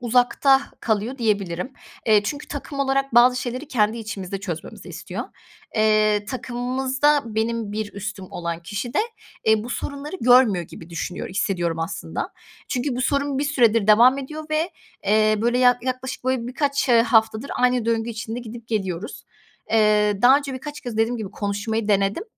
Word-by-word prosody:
uzakta 250 +3 +3 0.2
kalıyor 225 +4 -1
diyebilirim. 200 -1 -1 0.3
Eee, 215 -2 +5
çünkü 290 +8 -5
takım 285 0 -6
olarak 275 -2 0
bazı 250 +1 +6
şeyleri 255 +4 -5
kendi 220 -2 +1
içimizde 195 -3 -5
çözmemizi 175 -5 -7
istiyor. - - -6 0.5
Eee, 215 -1 +3
takımımızda 260 +4 0
benim 225 -1 -1
bir 215 -1 -4
üstüm 200 -1 -5
olan 170 -1 -4
kişi 210 +6 -5
de, - - +2 0.5
eee, 220 0 +3
bu 245 - -7
sorunları 290 +7 -5
görmüyor 240 -8 +5
gibi 165 +2 -12
düşünüyor, 170 +1 -4
hissediyorum, 175 -4 -1
aslında. 165 +4 -4 0.4
Çünkü 250 0 -1
bu - - -2
sorun 280 +1 0
bir 285 - 0
süredir 230 -7 +3
devam 240 +5 +6
ediyor 305 +3 -6
ve, 315 +3 0 0.4
eee, 215 +1 +4
böyle, 240 +1 +2
ya 250 -1 +5
yaklaşık, 255 0 -4
böyle, 260 -2 0
birkaç, 280 +2 -1
eee, 235 -2 +6
haftadır 225 +2 +2
aynı 250 -2 +2
döngü 230 0 0
için 225 +1 -5
de - - -4
gidip 235 0 -10
geliyoruz. 195 -2 -3 0.5
Eee, 210 -2 +3
daha 260 +3 +8
önce 280 -2 -6
birkaç 295 +3 -7
kez 240 -3 -6
dediğim 225 +2 +1
gibi 215 -4 -5
konuşmayı 205 +2 -2
denedim. 200 - +1
230 Hz, 160 wpm, -23 LUFS, 210-260 Hz, 0.5 s, daha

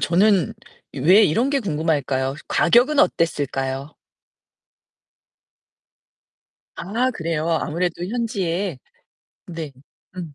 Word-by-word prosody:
저는 180 - +2 0.4
왜 185 +10 +5
이런 230 - +1
게 280 -1 +1
궁금할까요? 150 - -1
가격은 245 - +3
어땠을까요? 140 - 0 2.8
아, 230 +8 -1
그래요. 165 -6 -3
아무래도 170 +2 -1
현지에 195 - -2 0.7
네. 165 -4 -7 0.4
음. 165 -5 -7
170 Hz, 185 characters per minute, -22 LUFS, 150-205 Hz, 2.8 s, 왜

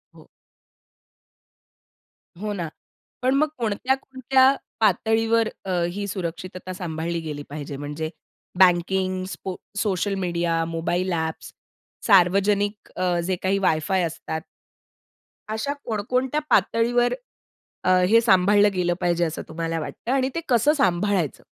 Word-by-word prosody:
हो. - - -16 2.1
हो 210 -1 -2
ना. 170 -4 -3 0.5
पण 255 +1 +2
मग 305 +2 +3
कोणत्या-कोणत्या 260 +3 +2 0.2
पातळीवर 225 +2 +2 0.2
अ, 190 - -5 0.2
ही 200 +2 -4
सुरक्षितता 185 0 -5
सांभाळली 170 -1 -3
गेली 150 -2 -5
पाहिजे? 145 -1 -6
म्हणजे 150 +2 -4 0.5
banking, 185 +1 +3
स्पो 180 +1 -5 0.2
social 200 -1 0
media, 170 -1 0
mobile 170 +3 -1
apps, 160 -1 -3 0.6
सार्वजनिक 200 +2 +3
अ, 180 -1 +1
जे 185 0 0
काही 190 +1 +2
वाय-फाय 180 +1 +1
असतात 160 -1 -4 1.1
अशा 220 +7 -2
कोणकोणत्या 250 +6 -1
पातळीवर 240 +1 +3 0.7
अ, - - +1 0.2
हे 230 +1 +7
सांभाळलं 205 -1 +5
गेलं 175 -1 +1
पाहिजे 175 0 +1
असं 160 0 -4
तुम्हाला 165 0 -3
वाटतं? 230 +9 -5
आणि 265 -1 +2
ते - - 0
कसं 255 +5 +4
सांभाळायचं? 185 - +1
190 Hz, 115 wpm, -24 LUFS, 170-225 Hz, 2.1 s, हे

